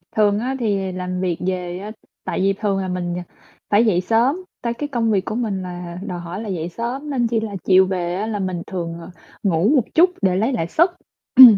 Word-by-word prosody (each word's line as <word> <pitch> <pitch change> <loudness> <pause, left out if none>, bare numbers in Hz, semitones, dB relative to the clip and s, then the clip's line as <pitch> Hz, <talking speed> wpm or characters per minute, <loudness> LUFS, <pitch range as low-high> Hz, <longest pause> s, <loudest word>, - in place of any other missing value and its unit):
Thường 210 -1 +4
á 260 +3 -1
thì 200 -4 0
làm 180 0 -3
việc 175 -3 0
về 180 -1 -2
á 210 +2 -6 0.3
tại - - -2
vì 195 +1 +3
thường 200 -1 0
là 190 - -2
mình, 175 -1 -2
ờ, 180 - -3 0.5
phải 210 +3 +5
dậy 185 -5 +3
sớm, 230 - +3 0.3
tại 235 -1 -1
cái 290 +4 -4
công 230 -4 +1
việc 195 -3 +1
của - - -3
mình 215 -5 -1
là 175 -1 -6
đòi 180 - -4
hỏi 175 +4 -6
là 220 - -5
dậy 175 -3 -2
sớm 245 - -4
nên 245 -4 +1
chi 230 -1 +1
là 215 -2 -4
chiều 190 0 +6
về 175 -2 -1
á, 210 +3 -2
là 215 -2 -2
mình 185 -3 -2
thường, 170 -3 -4
ờ, 170 - -10 0.3
ngủ 185 +1 +3
một 260 - +4
chút 355 +3 +7
để 185 -2 +3
lấy 225 +8 +1
lại 165 -8 -1
sức. 340 - +3 0.4
Ừm. 245 -6 +11
195 Hz, 240 wpm, -21 LUFS, 180-230 Hz, 0.5 s, Ừm